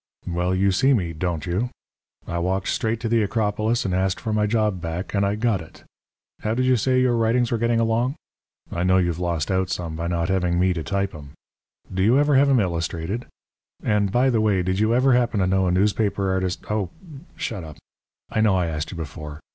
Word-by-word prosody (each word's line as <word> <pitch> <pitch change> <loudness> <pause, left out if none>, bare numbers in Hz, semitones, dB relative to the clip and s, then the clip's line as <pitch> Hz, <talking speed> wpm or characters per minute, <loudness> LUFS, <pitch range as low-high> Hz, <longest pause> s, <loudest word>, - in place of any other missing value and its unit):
"Well, 90 +1 0
you 95 +1 +2
see 135 +8 +3
me, 85 -7 -1
don't 80 -1 -2
you? 95 +8 -1 0.6
I 85 - -3
walked 95 +2 -1
straight 110 0 -1
to 115 - -1
the 115 0 +2
Acropolis 110 +2 0
and 95 - -1
asked 95 0 0
for 110 - -3
my 105 0 +2
job 105 -4 0
back, 85 +3 -4
and 100 -1 +2
I 100 +1 +1
got 110 -4 0
it. 80 - -14 0.6
How 110 +1 -1
did 130 +1 +1
you 130 0 +4
say 130 +2 +2
your 125 -2 +3
writings 115 +1 +2
were 115 - 0
getting 115 0 +2
along? 115 +4 +1 0.6
I 85 - -2
know 95 +1 +3
you've 85 -2 0
lost 85 -3 -1
out 95 -1 +1
some 85 -3 -3
by 85 +1 -3
not 85 -1 0
having 90 -2 +1
me 90 0 +3
to 85 - -3
type 100 +3 -2
'em. 70 -2 -11 0.6
Do 95 - -1
you 115 +7 +4
ever 145 0 +3
have 140 +1 +5
'em 135 -3 +4
illustrated? 85 +4 -2 0.6
And, 105 -2 +1
by 125 +4 +3
the 115 -2 +2
way, 100 -4 +2
did 95 +2 -1
you 110 +1 +2
ever 130 +1 +4
happen 120 -3 +2
to 95 - +2
know 95 0 +2
a - - +2
newspaper 100 +1 +1
artist 95 -1 -1
oh, 105 -4 -1 0.5
shut 100 -6 -4
up! 75 -2 -10 0.5
I 110 - +1
know 105 -3 +4
I 90 -2 +1
asked 80 -1 -3
you 90 - -7
before. 75 -1 -7
95 Hz, 220 wpm, -23 LUFS, 90-115 Hz, 0.6 s, have